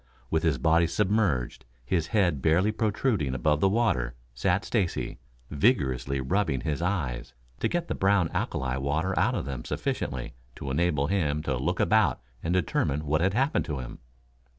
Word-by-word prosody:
With 80 - +2
his 80 -4 +1
body 85 +2 +3
submerged, 95 - 0 0.2
his 80 +3 0
head 85 -7 +1
barely 85 +8 +3
protruding 105 - 0
above 75 +4 +1
the 95 - +4
water, 80 - +1 0.2
sat 90 +10 0
Stacy, 100 -7 -1 0.3
vigorously 70 - +1
rubbing 75 0 0
his 75 -1 -2
eyes 65 -10 -2 0.2
to - - +1
get 175 -1 -2
the - - -1
brown 95 -2 +2
alkali 65 -1 -1
water 75 +8 0
out - - +2
of - - -2
them 65 -3 -5
sufficiently 60 -2 -3 0.2
to 70 - -5
enable 75 -1 +1
him 75 -4 0
to 65 -4 -1
look - - -1
about - - +3 0.2
and 80 - -2
determine 75 -4 0
what 75 +2 +1
had 95 +3 +1
happened 135 +5 +1
to 75 - -3
him. 65 -2 -7
80 Hz, 165 wpm, -27 LUFS, 70-95 Hz, 0.3 s, the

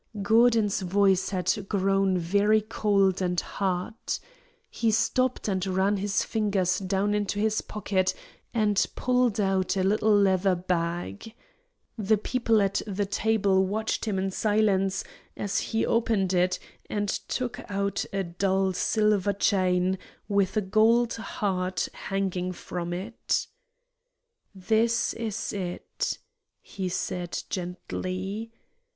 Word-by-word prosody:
Gordon's 225 -2 +4
voice 190 0 +2
had 190 +1 -1
grown 195 -1 +2
very 200 +5 +3
cold 200 -3 +1
and 180 -1 +1
hard. 185 +4 -2 0.7
He 230 - 0
stopped 255 +4 +1
and 190 -3 0
ran 190 +2 +1
his 195 0 0
fingers 200 -5 0
down 195 +2 0
into 205 -1 -1
his 215 0 +1
pocket 190 -3 -1 0.4
and 210 -3 +2
pulled 250 -4 +1
out 190 -1 +1
a 190 - +2
little 210 +2 +3
leather 190 -1 +3
bag. 175 - -3 0.6
The 215 +1 +3
people 225 -1 +1
at 195 0 0
the 200 0 -1
table 200 -2 +2
watched 220 +4 -1
him 210 -3 -1
in 190 0 -1
silence 195 -2 +1 0.3
as 200 -1 -1
he 225 - -1
opened 215 -5 +1
it 180 0 +2 0.3
and 205 -1 -1
took 250 +4 -3
out 200 0 -1
a 195 0 -1
dull 190 +2 0
silver 210 0 +2
chain 185 -2 +2 0.3
with 200 -1 +1
a - - +3
gold 225 +4 +3
heart 185 -5 -2
hanging 185 -2 -2
from 175 0 -5
it. 190 +7 -2 1.1
"This 225 +4 +1
is 225 -3 -4
it," 180 -3 -3 0.4
he 190 -2 -5
said, 175 -1 -3
gently. 185 +4 -4
195 Hz, 120 wpm, -27 LUFS, 185-215 Hz, 1.1 s, Gordon's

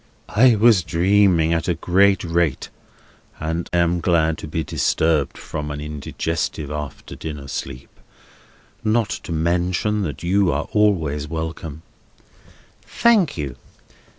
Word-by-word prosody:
"I 120 +2 +6
was 110 -2 +5
dreaming 85 0 +3
at 80 - -1
a 90 - +1
great 95 +4 +3
rate, 85 -4 0 0.7
and 80 +2 -3
am 85 0 +2
glad 80 -2 +2
to - - -7
be 80 +1 -2
disturbed 80 -3 0
from 75 0 -5
an 75 0 -5
indigestive 75 0 -4
after 75 -2 -6
dinner 75 -3 -7
sleep. 65 -1 -7 0.8
Not 110 0 +1
to - - -8
mention 90 +6 0
that 85 -5 -4
you 95 +1 +2
are - - -2
always 80 -9 +1
welcome." 80 -1 -5 1.0
"Thank 210 - +2
you. 70 -5 -4
85 Hz, 125 wpm, -21 LUFS, 75-95 Hz, 1.0 s, I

